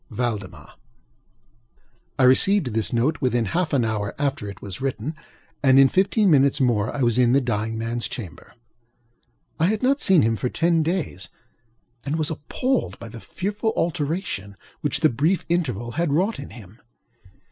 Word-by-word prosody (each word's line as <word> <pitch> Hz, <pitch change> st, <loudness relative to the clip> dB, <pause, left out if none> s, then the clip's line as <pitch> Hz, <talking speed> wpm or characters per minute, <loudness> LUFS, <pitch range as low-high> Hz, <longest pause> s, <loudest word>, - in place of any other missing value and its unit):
VALDEMAR 110 Hz, -5 st, -4 dB, 1.5 s
I 135 Hz, -, +2 dB
received 130 Hz, -, +4 dB
this 110 Hz, -1 st, -1 dB
note 130 Hz, +7 st, 0 dB
within 120 Hz, -3 st, +1 dB
half 170 Hz, -, -1 dB
an 130 Hz, -5 st, +2 dB
hour 105 Hz, -2 st, -2 dB
after 140 Hz, -7 st, -2 dB
it 100 Hz, -, -10 dB
was 100 Hz, +1 st, -8 dB
written, 135 Hz, +2 st, -3 dB, 0.5 s
and 135 Hz, -2 st, +5 dB
in 135 Hz, 0 st, +7 dB
fifteen 195 Hz, -, +2 dB
minutes 140 Hz, 0 st, +4 dB
more 115 Hz, -5 st, +1 dB
I 140 Hz, -, -2 dB
was 120 Hz, 0 st, +2 dB
in 120 Hz, -1 st, +4 dB
the 135 Hz, -, +5 dB
dying 115 Hz, -3 st, -2 dB
manŌĆÖs 115 Hz, +1 st, -3 dB
chamber. 95 Hz, -, -9 dB, 1.0 s
I 165 Hz, -, +3 dB
had 215 Hz, +3 st, -1 dB
not 275 Hz, +3 st, +2 dB
seen 185 Hz, -5 st, +5 dB
him 115 Hz, 0 st, +1 dB
for 125 Hz, +5 st, -2 dB
ten 165 Hz, +2 st, +2 dB
days, 155 Hz, -, -2 dB, 0.7 s
and 145 Hz, +2 st, -2 dB
was 155 Hz, -1 st, 0 dB
appalled 250 Hz, -, -2 dB
by 115 Hz, -, -9 dB
the 115 Hz, 0 st, -10 dB
fearful 210 Hz, +4 st, -3 dB
alteration 155 Hz, -, -2 dB, 0.2 s
which 145 Hz, -, -1 dB
the 155 Hz, -, +5 dB
brief 155 Hz, +10 st, 0 dB
interval 125 Hz, -, -1 dB
had 170 Hz, +3 st, -1 dB
wrought 190 Hz, +9 st, +1 dB
in 140 Hz, -, -8 dB
him. 110 Hz, -2 st, -14 dB
135 Hz, 165 wpm, -23 LUFS, 115-165 Hz, 1.5 s, in